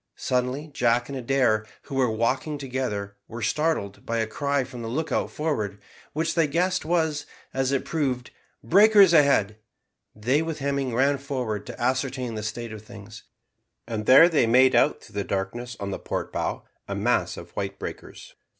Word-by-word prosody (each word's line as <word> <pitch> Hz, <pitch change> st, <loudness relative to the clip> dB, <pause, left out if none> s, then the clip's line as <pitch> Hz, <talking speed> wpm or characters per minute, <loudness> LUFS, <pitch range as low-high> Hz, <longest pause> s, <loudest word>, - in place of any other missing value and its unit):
Suddenly, 130 Hz, +4 st, -1 dB
Jack 120 Hz, -1 st, +1 dB
and 140 Hz, -, -5 dB
Adair, 125 Hz, -4 st, +2 dB, 0.2 s
who 140 Hz, -, -10 dB
were 130 Hz, -2 st, +2 dB
walking 125 Hz, +7 st, -1 dB
together, 125 Hz, -7 st, -4 dB
were 115 Hz, 0 st, -7 dB
startled 130 Hz, -5 st, -1 dB
by 115 Hz, -, -2 dB
a 110 Hz, -, +1 dB
cry 140 Hz, +5 st, -1 dB
from 125 Hz, -1 st, -9 dB
the 115 Hz, -, -5 dB
lookout 155 Hz, +7 st, -1 dB
forward, 110 Hz, -11 st, -2 dB, 0.3 s
which 160 Hz, +2 st, 0 dB
they 165 Hz, -3 st, +3 dB
guessed 180 Hz, +5 st, 0 dB
was, 160 Hz, -3 st, 0 dB, 0.3 s
as 135 Hz, 0 st, 0 dB
it 135 Hz, -, 0 dB
proved, 130 Hz, -6 st, -2 dB, 0.3 s
"Breakers 200 Hz, -1 st, +6 dB
ahead." 135 Hz, -9 st, +4 dB, 0.6 s
They, 125 Hz, +8 st, +1 dB
with 160 Hz, -1 st, -3 dB
Hemming, 140 Hz, -3 st, -1 dB
ran 140 Hz, +3 st, +2 dB
forward 125 Hz, -7 st, -3 dB
to -, -, -8 dB
ascertain 130 Hz, 0 st, -1 dB
the 110 Hz, -, -4 dB
state 110 Hz, +2 st, -5 dB
of 110 Hz, -, -8 dB
things, 110 Hz, -1 st, -12 dB, 0.6 s
and 110 Hz, -2 st, -4 dB
there 135 Hz, +6 st, +9 dB
they 155 Hz, -9 st, +2 dB
made 130 Hz, +3 st, +5 dB
out -, -, +3 dB
through -, -, -16 dB
the -, -, -3 dB
darkness 115 Hz, +6 st, -4 dB
on 100 Hz, 0 st, -4 dB
the -, -, -4 dB
port -, -, -4 dB
bow -, -, -2 dB, 0.2 s
amass -, -, 0 dB
of -, -, -10 dB
white 100 Hz, -1 st, -4 dB
breakers. -, -, -8 dB
130 Hz, 170 wpm, -25 LUFS, 110-145 Hz, 0.6 s, there